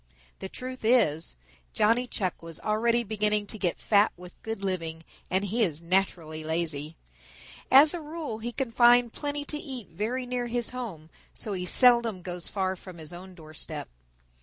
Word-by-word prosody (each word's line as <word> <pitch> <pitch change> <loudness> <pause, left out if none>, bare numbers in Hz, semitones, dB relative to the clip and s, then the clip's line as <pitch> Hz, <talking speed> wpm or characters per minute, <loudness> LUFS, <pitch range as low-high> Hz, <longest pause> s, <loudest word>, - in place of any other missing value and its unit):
The 190 - -6
truth 255 +2 -8
is, 210 -10 +3 0.4
Johnny 230 +4 +3
Chuck 185 -6 -3
was 165 -1 -6
already 230 +2 +1
beginning 210 -1 0
to 215 - -5
get 180 -4 0
fat 205 0 +3
with 180 0 -13
good 225 -2 -5
living 165 -4 -3 0.3
and 190 +2 +1
he 220 +5 -1
is 165 -8 +1
naturally 170 -3 -1
lazy. 160 -1 -2 0.7
As 290 +4 +8
a 345 - -4
rule 300 -7 -5
he 235 +2 -4
can 260 -1 -3
find 240 0 +5
plenty 290 0 -3
to 300 +1 -2
eat 260 - -7
very 225 +9 -3
near 245 -1 -2
his 240 0 -1
home, 195 -11 -7 0.2
so 210 - -3
he 180 -1 -3
seldom 235 -5 +6
goes 175 -1 -4
far 190 -2 -1
from 185 -1 -12
his 160 0 -8
own 185 +1 -10
doorstep. 155 - -8
210 Hz, 170 wpm, -28 LUFS, 175-240 Hz, 0.7 s, As